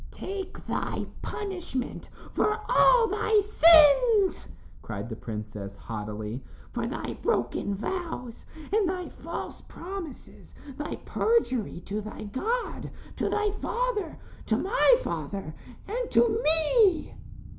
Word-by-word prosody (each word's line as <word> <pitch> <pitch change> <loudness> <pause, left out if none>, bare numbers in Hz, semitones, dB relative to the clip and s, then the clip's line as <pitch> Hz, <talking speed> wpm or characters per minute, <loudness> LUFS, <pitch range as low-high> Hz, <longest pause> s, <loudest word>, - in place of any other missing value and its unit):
"Take 390 0 -6
thy - - -2 0.2
punishment 355 - -4 0.2
for 425 +1 +1
all 480 -2 +6
thy 430 0 +2
sins," 390 +2 +6 0.3
cried 105 +1 -5
the 110 - -4
princess, 105 -3 -6
haughtily, 105 +2 -5 0.3
"for - - -2
thy - - -4
broken 125 +11 0
vows 250 - -4 0.3
and 420 -4 +3
thy 365 -1 -3
false - - -7
promises 345 -6 -9 0.2
thy 295 +2 -4
perjury 255 - +1
to 205 +4 -4
thy 215 +1 -7
God, 435 - -2 0.3
to - - 0
thy 425 -1 +1
father, 425 -4 -2 0.3
to - - +2
my - - +5
father 195 -6 -4 0.3
and 475 +3 -2
to 455 -1 +3
me." 325 +4 +3
345 Hz, 115 wpm, -28 LUFS, -, 0.3 s, all